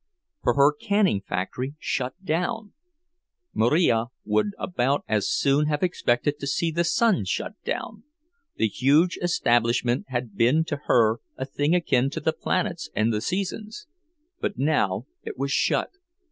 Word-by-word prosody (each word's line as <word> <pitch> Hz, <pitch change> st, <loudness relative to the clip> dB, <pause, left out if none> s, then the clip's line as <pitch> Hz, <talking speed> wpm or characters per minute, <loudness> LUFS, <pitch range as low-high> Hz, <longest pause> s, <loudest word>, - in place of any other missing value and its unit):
For -, -, +1 dB
her 140 Hz, +1 st, +5 dB
canning 200 Hz, -, +1 dB
factory 125 Hz, +11 st, -4 dB
shut 130 Hz, -4 st, -2 dB
down! 180 Hz, +7 st, -2 dB, 0.8 s
Marija 120 Hz, -2 st, +3 dB, 0.2 s
would 105 Hz, 0 st, +2 dB
about 140 Hz, -5 st, 0 dB
as 105 Hz, -2 st, 0 dB
soon 140 Hz, +2 st, +2 dB
have 150 Hz, +1 st, -1 dB
expected 145 Hz, -5 st, 0 dB
to 140 Hz, -, -4 dB
see 165 Hz, +4 st, 0 dB
the 170 Hz, +2 st, +1 dB
sun 210 Hz, -, +2 dB
shut 95 Hz, -, -3 dB
down—the 305 Hz, -, -5 dB
huge 145 Hz, -, +2 dB
establishment 120 Hz, -7 st, +1 dB
had 120 Hz, -5 st, -4 dB
been 125 Hz, +10 st, +3 dB
to 145 Hz, -, -3 dB
her 115 Hz, -1 st, +3 dB, 0.2 s
a 130 Hz, -, -3 dB
thing 145 Hz, +4 st, 0 dB
akin 135 Hz, -7 st, +2 dB
to -, -, -5 dB
the -, -, 0 dB
planets -, -, -2 dB
and 110 Hz, +2 st, +2 dB
the 105 Hz, -, -1 dB
seasons. 210 Hz, -, -4 dB, 0.5 s
But -, -, -3 dB
now 120 Hz, -8 st, +1 dB, 0.2 s
it -, -, -7 dB
was 140 Hz, +1 st, -2 dB
shut! -, -, +1 dB
140 Hz, 145 wpm, -25 LUFS, 120-175 Hz, 0.8 s, her